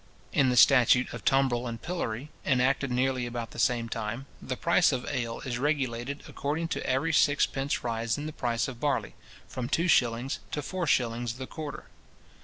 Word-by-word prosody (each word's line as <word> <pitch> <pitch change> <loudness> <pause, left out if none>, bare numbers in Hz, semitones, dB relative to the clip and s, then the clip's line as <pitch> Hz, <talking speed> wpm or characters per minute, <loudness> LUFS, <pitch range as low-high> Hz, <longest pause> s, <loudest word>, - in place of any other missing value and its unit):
In 135 -2 +4
the 125 - +1
statute 125 -1 +6
of - - -7
Tumbrel 130 -3 +2
and 115 -1 -5
Pillory, 150 -6 -4
enacted 135 +1 +2
nearly 125 0 0
about 120 -2 -5
the - - -8
same 120 -1 +2
time, 115 +3 -4 0.2
the 130 - -4
price 170 0 +4
of 130 -2 -2
ale 125 -5 -3
is 125 -3 -3
regulated 135 -2 -1
according 160 +4 -3
to - - -2
every 135 +5 +1
sixpence 145 -2 +2
rise 115 -1 -1
in 145 - -5
the 155 - -5
price 120 -4 -1
of 125 -3 -7
barley, 145 0 -1 0.3
from 125 -1 -5
two 170 +4 +1
shillings, 120 -3 +2
to 150 - -2
four 180 +2 -3
shillings 120 -3 +1
the 130 +1 -6
quarter. 150 0 -7
130 Hz, 180 wpm, -28 LUFS, 120-145 Hz, 0.3 s, statute